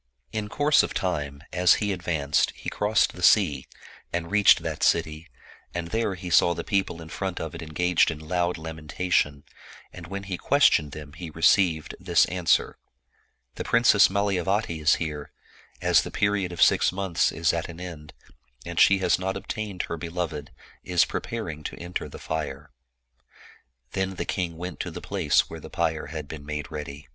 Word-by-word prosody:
In 105 -1 -3
course 145 +4 +4
of - - -4
time, 75 -7 -2
as 90 0 +5
he 105 -2 -1
advanced, 80 -6 0
he - - -6
crossed 105 +1 +2
the 90 - -10
sea, 80 -8 +4 0.4
and 85 0 -3
reached 105 0 +5
that - - -4
city, 80 +2 +1 0.5
and 85 -1 -3
there 110 0 -1
he 90 0 -7
saw 85 +1 +5
the 85 - -4
people 95 -5 -1
in 80 - -12
front 95 0 -4
of 80 -2 -5
it - - -7
engaged 85 +2 +2
in 80 - -4
loud 85 +3 -1
lamentation, 80 -2 -1 0.5
and 85 -2 -10
when 100 +2 -5
he 95 -2 -5
questioned 75 -2 +3
them, 75 -2 -9
he 85 +1 -7
received 80 0 +2
this - - +3
answer, 90 -2 +1 0.4
" - - -42
The - - -3
Princess 115 -4 +5
Malayavati 95 -3 0
here, 75 -3 -5 0.5
as - - +5
the - - -6
period 100 -3 0
of 85 - +3
six - - +4
months 95 -2 0
is 80 -1 +1
at 85 0 -3
an 85 0 -9
end, 85 -5 -9 0.5
and - - -3
she 100 - +6
has - - +3
not 95 +1 -2
ob 100 - -10
tained 105 -4 -3
her 85 - -5
beloved, 85 -3 -4 0.3
is 90 -2 +3
preparing 90 -10 -5
to - - -5
enter 90 +1 -5
the - - -10
fire." 75 -3 -5 1.2
Then 95 0 -2
the - - -3
king 85 -4 -3
went 90 0 -6
to - - -3
the - - -7
place - - +1
where - - -8
the - - -10
pyre 80 -2 -1
had 75 -1 -6
been 75 -1 -8
made 75 -1 -5
ready. 75 -2 -7
85 Hz, 180 wpm, -26 LUFS, 80-95 Hz, 1.2 s, she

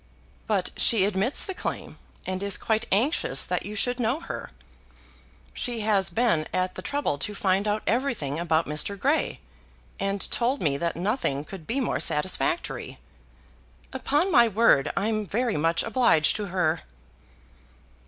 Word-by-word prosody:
"But - - 0
she 215 -6 +5
admits 205 +6 0
the 385 - -4
claim, - - -5 0.3
and 185 0 -3
is 200 -1 +3
quite 220 +1 -1
anxious 245 - +2
that - - -2
you 210 - -6
should 245 +4 0
know 245 +5 +1
her. - - -7 1.0
She 240 -3 -3
has 205 -3 +2
been 170 -6 +1
at 185 0 -1
the - - -7
trouble 285 - -2
to 205 +9 -2
find 195 +1 +1
out 210 +1 0
everything 225 - -1
about 165 -1 +1
Mr. 150 +7 -1
Grey, 290 +7 0 0.6
and 195 0 -1
told 250 +4 +1
me 145 -4 +1
that 170 +3 -2
nothing 175 - -1
could 180 -4 -10
be 255 +4 -1
more 255 - -1
satisfactory." 190 - -1 1.0
"Upon 330 +7 +1
my 240 -6 +6
word 210 -10 +3
I 195 - +1
am 215 -1 0
very 230 +3 -1
much 165 +3 +1
obliged 225 -9 +3
to 210 - -3
her." 175 -3 0
205 Hz, 155 wpm, -26 LUFS, 175-240 Hz, 1.0 s, my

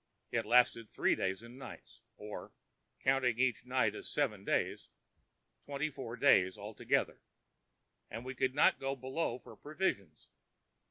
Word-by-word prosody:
It 115 -3 0
lasted 120 -2 +4
three - - +2
days 95 +3 -1
and 120 +3 -12
nights, - - -11 0.2
or, 105 0 -8 0.5
counting 130 -3 +3
each 125 -1 +1
night 125 -5 +2
as - - -7
seven 110 -10 0
days, - - -1 0.8
twenty 145 +2 -2
four 125 -3 -6
days 95 -10 +5
altogether, 105 +1 -1 0.9
and 115 +3 -6
we 130 - -4
could 130 0 0
not 145 - +5
go 135 0 -2
below 130 0 -2
for 125 - -13
provisions. 145 - -3
125 Hz, 140 wpm, -34 LUFS, 110-135 Hz, 0.9 s, days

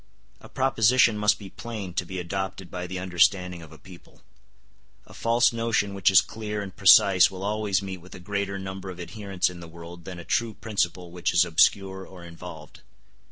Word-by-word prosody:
A - - -14
proposition 125 -2 +3
must 105 0 +2
be 100 -2 -11
plain 105 -6 -7
to 90 -1 -2
be 95 - -6
adopted 95 +1 -4
by 90 0 -5
the 95 +1 -5
understanding 90 0 +1
of 80 -1 -13
a 80 - -13
people. 85 +3 -16 0.8
A - - -16
false 120 +1 +2
notion 115 -3 0
which 100 -1 +3
is 95 - +7
clear 105 -2 -5
and 95 -2 -9
precise 95 -1 +6
will 95 0 -8
always 105 -2 0
meet 95 -1 -5
with 90 - -13
a - - -10
greater 100 +1 -3
number 95 0 -7
of 90 -1 -9
adherents 95 +1 -2
in 90 -1 -7
the 85 - -10
world 85 +1 -12
than 90 -2 -7
a 85 - -9
true 115 +5 -1
principle 90 -5 -2
which 90 0 -2
is 85 - +5
obscure 95 +4 +2
or 95 -2 -13
involved. 85 -2 -11
95 Hz, 195 wpm, -25 LUFS, 90-100 Hz, 0.8 s, is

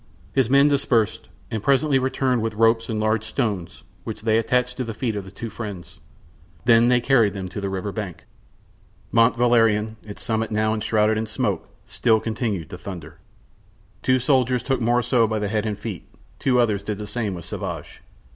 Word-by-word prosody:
His 130 -4 +2
men 140 +2 +6
dispersed, 115 -6 +1 0.2
and 110 -3 -2
presently 140 +2 +3
returned 130 -2 0
with 110 -1 -2
ropes 115 +1 +3
and 110 -1 -1
large 110 0 +1
stones, 105 -6 -3 0.2
which - - -7
they 110 0 +3
attached 125 +2 0
to 130 - -1
the 115 -2 -6
feet 115 -2 -2
of 100 -2 -4
the - - -9
two 110 +3 -7
friends; 100 -5 -8 0.7
then 115 0 +6
they 125 0 +4
carried 120 -5 +3
them 95 -2 -4
to 100 - -6
the 100 - -2
river 95 +1 -3
bank. 100 -5 -6 0.9
Mont 115 0 +4
Valerien, 115 -3 +3
its 105 -1 -9
summit 110 -2 -1
now 110 0 +1
enshrouded 110 0 +1
in 110 - -3
smoke, 110 - -2 0.2
still 110 -2 +2
continued 110 -6 -3
to 90 - -7
thunder. 85 -6 -8 0.8
Two 130 0 +3
soldiers 125 -1 +2
took 135 -1 0
Morissot 120 0 +2
by 110 - -1
the 105 -1 -2
head 110 +1 -1
and 105 -2 -2
the - - -23
feet; 105 -7 -6 0.3
two 125 -2 +2
others 105 -4 +2
did 105 0 -4
the 105 - -6
same 105 -2 -3
with 85 - -8
Sauvage. - - -6
110 Hz, 190 wpm, -23 LUFS, 105-120 Hz, 0.9 s, men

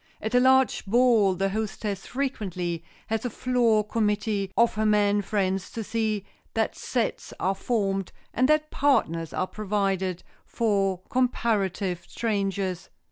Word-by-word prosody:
At 220 +2 -4
a 245 - +6
large 260 0 +4
ball 225 -4 +4
the 195 +2 0
hostess 210 -1 -3
frequently 185 -11 -3 0.2
has 225 0 -2
a 245 - -1
floor 235 -2 +2
committee 210 -2 0
of 235 0 +4
her 215 - -1
men 205 -1 +3
friends 195 -2 -1
to 225 - -3
see 215 -2 -1 0.3
that 220 -1 0
sets 240 -3 -2
are 190 - +1
formed 195 -2 -1 0.2
and 255 +3 +2
that 305 0 +2
partners 170 - +1
are - - -1
provided 195 -3 -1 0.2
for 195 -5 0
comparative 205 -8 0
strangers. 195 -4 -2
210 Hz, 135 wpm, -26 LUFS, 195-235 Hz, 0.3 s, a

